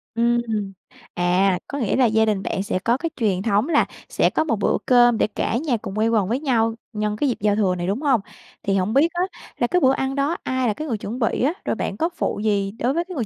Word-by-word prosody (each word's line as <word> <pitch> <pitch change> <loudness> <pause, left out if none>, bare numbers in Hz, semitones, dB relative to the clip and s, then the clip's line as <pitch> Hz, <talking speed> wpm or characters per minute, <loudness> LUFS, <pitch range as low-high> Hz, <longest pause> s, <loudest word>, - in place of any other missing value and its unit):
Ừm. 230 -4 0 0.4
À, 180 +1 +2
có 285 - -5
nghĩa 225 -8 0
là 260 - +4
gia 220 -1 +3
đình 205 -3 0
bạn 190 - -2
sẽ 185 - -2
có 235 +6 +1
cái 330 +4 -3
truyền 200 -6 0
thống 210 +6 +1
là 300 - +4 0.2
sẽ - - +2
có - - 0
một 290 -8 0
bữa - - +2
cơm 240 -2 +5
để - - +2
cả 215 +1 -2
nhà 265 -3 0
cùng 205 -1 -7
quây 220 +1 +2
quần 215 -5 +2
với 240 +6 0
nhau 230 -6 +1 0.2
nhân 210 0 -1
cái 280 +6 0
dịp 240 - -1
giao 205 0 +2
thừa 195 -4 +1
này, 175 0 -3
đúng 205 +8 -1
hông? 270 -7 +2 0.4
Thì 195 -1 0
hổng 190 +3 0
biết 280 +5 +5
á, 350 - -1 0.4
là 240 - +1
cái 360 - +2
bữa 260 - +5
ăn 265 0 -2
đó 285 +4 0
ai 260 -1 0
là 215 - +1
cái 310 +9 -6
người 230 -6 -1
chuẩn 215 +4 -6
bị 235 0 0
á, 295 +6 +2
rồi - - 0
bạn - - -3
có 330 +2 +1
phụ - - -2
gì 200 -2 +1
đối 235 +5 -1
với 340 +3 0
cái 365 0 -8
người 245 -6 -1
230 Hz, 270 wpm, -22 LUFS, 205-265 Hz, 0.4 s, cơm